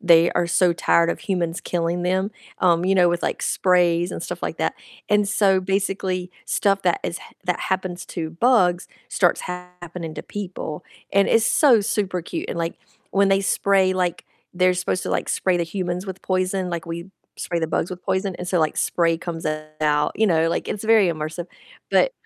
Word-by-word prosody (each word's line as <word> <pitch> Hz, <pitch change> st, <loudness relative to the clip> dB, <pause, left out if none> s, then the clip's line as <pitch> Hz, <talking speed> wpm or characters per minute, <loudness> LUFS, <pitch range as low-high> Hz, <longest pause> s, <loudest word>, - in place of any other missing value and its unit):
they 170 Hz, -4 st, +5 dB
are 175 Hz, -, +1 dB
so 175 Hz, +1 st, +3 dB
tired 170 Hz, 0 st, +3 dB
of -, -, -4 dB
humans 175 Hz, -3 st, -2 dB
killing 175 Hz, 0 st, -1 dB
them, 190 Hz, +3 st, 0 dB, 0.3 s
um, 175 Hz, -1 st, +3 dB
you 195 Hz, -, +3 dB
know, 180 Hz, -2 st, +5 dB
with, 175 Hz, 0 st, -1 dB
like, -, -, -2 dB
sprays 175 Hz, -1 st, +2 dB
and -, -, -5 dB
stuff -, -, -6 dB
like -, -, -3 dB
that. -, -, -1 dB, 0.3 s
And 210 Hz, -1 st, +3 dB
so 195 Hz, -3 st, +3 dB
basically, 190 Hz, -1 st, -1 dB, 0.2 s
stuff 195 Hz, -1 st, +1 dB
that 175 Hz, -2 st, +2 dB
is 170 Hz, -, -3 dB
ha -, -, -14 dB
that 180 Hz, -1 st, -1 dB
happens 185 Hz, -1 st, -2 dB
to 160 Hz, -3 st, -4 dB
bugs 180 Hz, -2 st, +2 dB, 0.2 s
starts 175 Hz, -2 st, +2 dB
happening 180 Hz, -2 st, -7 dB
to -, -, -6 dB
people, 185 Hz, -6 st, -6 dB, 0.3 s
and 200 Hz, 0 st, +4 dB
it's 225 Hz, -1 st, +4 dB
so 255 Hz, -8 st, +5 dB
super 190 Hz, -3 st, -1 dB
cute. -, -, -5 dB
And, -, -, -4 dB
like, 165 Hz, 0 st, -2 dB, 0.4 s
when 200 Hz, 0 st, +3 dB
they 195 Hz, 0 st, +3 dB
spray, 190 Hz, -1 st, +2 dB
like, 180 Hz, -2 st, -1 dB, 0.3 s
they're 180 Hz, 0 st, +3 dB
supposed 180 Hz, 0 st, -1 dB
to, -, -, -4 dB
like, -, -, -1 dB
spray 185 Hz, -2 st, +1 dB
the -, -, +1 dB
humans 180 Hz, +1 st, -3 dB
with 190 Hz, -1 st, -7 dB
poison, 185 Hz, 0 st, -1 dB
like, 170 Hz, -1 st, -4 dB
we 170 Hz, +3 st, -6 dB, 0.3 s
spray 170 Hz, -1 st, -2 dB
the 160 Hz, -, 0 dB
bugs 165 Hz, +2 st, -1 dB
with 180 Hz, 0 st, -7 dB
poison, 190 Hz, 0 st, -1 dB
and 180 Hz, -, -5 dB
so, 180 Hz, -1 st, +1 dB
like, 155 Hz, -1 st, +1 dB
spray 165 Hz, -1 st, +1 dB
comes 165 Hz, -3 st, -5 dB, 0.3 s
out, 150 Hz, -1 st, +2 dB
you 220 Hz, -, +2 dB
know, 165 Hz, -3 st, +3 dB
like, -, -, -2 dB
it's 210 Hz, -, -4 dB
very 220 Hz, -4 st, +5 dB
immersive. 155 Hz, +2 st, -4 dB, 0.4 s
But -, -, +3 dB
180 Hz, 195 wpm, -22 LUFS, 170-190 Hz, 0.4 s, they